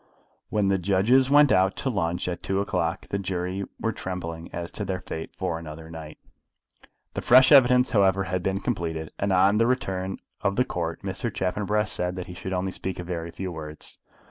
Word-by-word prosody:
When 105 -2 +1
the 95 -1 +2
judges 100 +8 +3
went 145 0 +6
out 95 +1 +3
to 135 - -2
lunch 90 -5 -1
at 90 -1 -3
two 95 0 -1
o'clock 95 -4 -1
the 100 - -1
jury 95 0 -3
were 115 - 0
trembling 85 -4 -5
as 85 0 -5
to 105 - -5
their 95 -2 -3
fate 80 -2 -7
for 90 -3 -2
another 80 0 -9
night. 80 -1 -9 1.0
The - - -3
fresh 130 +2 +7
evidence, 125 -2 +6
however, 95 -3 +3
had 90 -1 -2
been 95 +1 -1
completed, 80 -9 -3
and 100 0 0
on 100 +3 +4
the 115 - +4
return 95 -7 -1 0.2
of 100 -1 +1
the 125 - +2
Court 85 -6 -4
Mr. 100 +4 -3
Chaffanbrass 105 +2 0
said 90 0 0
that 90 -1 -5
he 90 - -9
should 95 +2 -6
only 95 0 -1
speak 95 0 -4
a 90 - -5
very 85 -1 -4
few 90 +2 -5
words. 75 -2 -7
95 Hz, 195 wpm, -26 LUFS, 85-100 Hz, 1.0 s, fresh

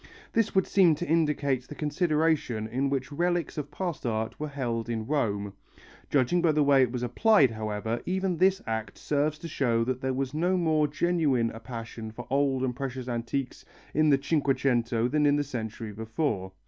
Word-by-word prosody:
This 225 -3 +1
would 190 - +4
seem 180 -5 +4
to 175 +4 -5
indicate 150 -5 +1
the 150 - -8
consideration 150 - 0
in 130 +5 -1
which 135 0 -2
relics 175 +1 0
of 145 -2 -4
past 170 0 -4
art 110 -2 -2
were 150 - -2
held 120 -5 -3
in 110 -2 -2
Rome. 105 -8 -1 0.6
Judging 145 +6 +2
by 165 -3 +3
the 150 0 +3
way 140 -1 +5
it 125 -2 +2
was 125 -1 -3
applied, 135 - +4
however, 110 +1 -3
even 190 0 0
this 190 +2 +3
act 110 -2 -4
serves 150 +1 0
to 165 - -7
show 120 -7 +1
that 130 +1 -2
there 130 - 0
was 135 0 -2
no 175 +4 +1
more 155 -3 +2
genuine 145 -7 +1
a 115 - -9
passion 115 -1 -7
for 120 +2 -8
old 135 -1 +2
and 125 -2 -1
precious 130 -1 -5
antiques 120 +2 -3 0.3
in 155 +1 +3
the 140 - +5
Cinquecento 130 -5 +1
than 150 +2 +2
in 145 - +4
the 145 - +1
century 115 -5 -5
before. 110 -2 -2
135 Hz, 185 wpm, -28 LUFS, 115-155 Hz, 0.6 s, way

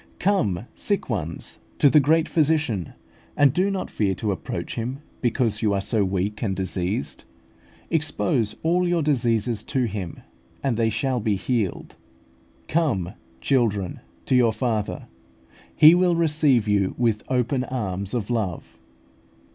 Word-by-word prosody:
Come, 120 - +1
sick 200 - -2
ones, 85 -7 -4 0.2
to - - +5
the 150 +2 +6
great 160 +3 +3
Physician, 150 - +1 0.4
and 140 -3 +5
do 185 +3 +2
not 195 -2 -3
fear 100 -3 0
to 105 +1 -2
approach 95 - -4
Him 120 +3 -3 0.2
because 115 -3 +1
you 105 -3 +2
are - - +1
so 105 +2 +1
weak 100 +2 -2
and 100 -4 -1
diseased: 95 -3 -2 0.7
expose 150 -8 0
all 175 +2 +2
your 175 -2 +1
diseases 120 -6 +1
to 130 - 0
Him, 100 -7 -4 0.4
and 135 -4 +1
they 115 0 +2
shall 125 +4 0
be 105 -2 0
healed. 105 -1 -2 0.7
Come, 120 - 0 0.3
children, 105 -9 0 0.3
to 130 - +2
your 120 -3 +4
Father; 110 -4 -2 0.7
He 155 +2 +8
will 180 -1 +3
receive 150 -8 +2
you 100 -2 +1
with 115 -3 +1
open 125 0 +1
arms 100 -5 -3
of 115 -1 -2
love. 105 -8 -3
115 Hz, 140 wpm, -24 LUFS, 100-145 Hz, 0.7 s, He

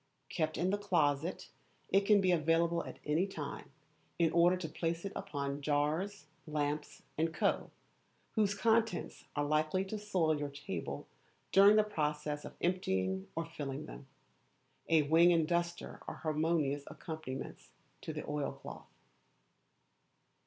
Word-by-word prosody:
Kept 155 -2 -1
in 180 +2 +1
the 205 - 0
closet, 165 -4 0 0.4
it 195 +1 +3
can 210 -2 +6
be 185 -1 +3
available 165 +1 +2
at - - -8
any 160 +6 +2
time, 150 -7 -6 0.5
in 165 -2 +3
order 175 +2 +5
to 175 -3 -4
place 165 +2 -2
upon 145 -8 -3
it - - -10
jars, 150 +7 0 0.2
lamps, 150 0 -2 0.2
&c., 160 - +3 1.0
whose 205 -2 +2
contents 225 -2 +1
are 145 - +1
likely 155 +5 +1
to 210 +2 -4
soil 175 -7 +1
your 145 -1 -2
table 140 0 -5 0.4
during 200 +2 +8
the 215 - +6
process 150 -6 -2
of - - -9
emptying 95 - 0
or 165 +1 -1
filling 145 -3 -5
them. 135 - -10 0.8
A 160 -2 +5
wing 165 +4 +6
and 165 -2 +3
duster 170 0 -2
are - - -4
harmonious 155 -2 0
accompaniments 155 -6 -7 0.3
to - - -5
the - - -6
oilcloth. 145 -1 -4
165 Hz, 135 wpm, -34 LUFS, 150-185 Hz, 1.0 s, during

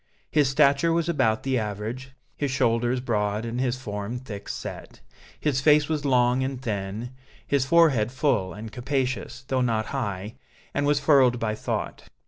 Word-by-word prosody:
His 145 -4 +3
stature 140 +3 +3
was 165 0 +1
about 130 -10 +1
the 130 -2 +1
average, 110 +5 -5 0.2
his 145 - -2
shoulders 120 -1 +1
broad 105 -3 -1
and 120 +2 -3
his 130 -1 0
form 105 -1 -5
thick 115 -6 -8
set. - - -7 0.4
His 140 -3 0
face 150 0 +5
was 150 -2 -1
long 125 -1 +3
and 135 -1 -3
thin, 110 0 -4 0.3
his 140 -2 +1
forehead 140 -9 +4
full 125 -9 0
and 105 +4 -8
capacious, 135 +1 -2
though 130 -1 +1
not 110 -3 +1
high, 105 -3 -3 0.4
and 145 0 0
was 145 0 +3
furrowed 130 -6 +4
by 110 -2 -1
thought. 110 - -4
125 Hz, 160 wpm, -25 LUFS, 110-140 Hz, 0.4 s, face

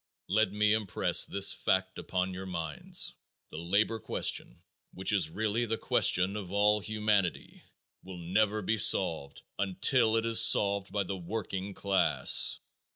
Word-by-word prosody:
Let 105 +1 +1
me 105 +1 +1
impress 110 -4 +2
this 100 0 +2
fact 95 0 -2
upon 95 0 -3
your 95 +1 -8
minds: 80 -5 -3 0.4
the 75 - -8
labor 100 +6 -1
question, - - -4 0.3
which 95 +3 -1
is 90 -6 +1
really 110 +6 -2
the 115 +1 -2
question 95 -1 +1
of 100 -4 -7
all 105 +1 +2
humanity, 105 -3 -2 0.4
will 95 -1 -11
never 105 +5 -1
be 110 +3 -1
solved 80 -8 +1 0.2
until 110 +4 +1
it 115 - -2
is 115 0 +4
solved 100 -3 +3
by 100 0 -1
the 95 +1 -6
working 95 +1 -6
class. 100 -1 +3
100 Hz, 145 wpm, -29 LUFS, 95-110 Hz, 0.4 s, is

